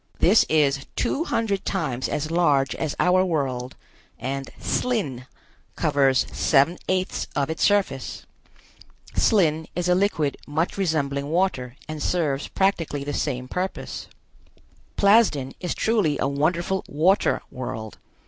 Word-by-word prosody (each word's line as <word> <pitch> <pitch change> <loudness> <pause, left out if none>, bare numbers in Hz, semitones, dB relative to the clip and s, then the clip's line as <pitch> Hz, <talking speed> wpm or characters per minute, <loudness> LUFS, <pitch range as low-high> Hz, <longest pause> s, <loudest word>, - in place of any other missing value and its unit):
This 205 +6 +5
is 140 -3 +2
two 285 +6 0
hundred 205 - -1
times 140 -10 -2
as 155 +2 -2
large 145 -6 +2
as 155 -3 -3
our 185 +1 +4
world, 135 -7 -2 0.4
and 135 +3 -4
"slin" 145 - -1 0.5
covers 140 -3 +2
seven 155 +4 +3
eighths 185 0 -1
of 140 +1 0
its 160 - -5
surface. 200 -11 +1 0.9
Slin 160 -7 +3
is 175 0 -1
a 180 - +4
liquid 180 -7 +1
much 160 +4 -1
resembling 145 -6 -1
water 155 -8 0
and 155 -1 -6
serves 150 -6 0
practically 165 -7 0
the 145 +1 -4
same 130 -3 -2
purpose. 180 +7 -4 0.9
Plasden 200 - +4
is 180 - -3
truly 205 -10 +1
a - - 0
wonderful 170 +7 0
water 175 +7 +2
world. 110 -4 -6
155 Hz, 125 wpm, -24 LUFS, 140-185 Hz, 0.9 s, This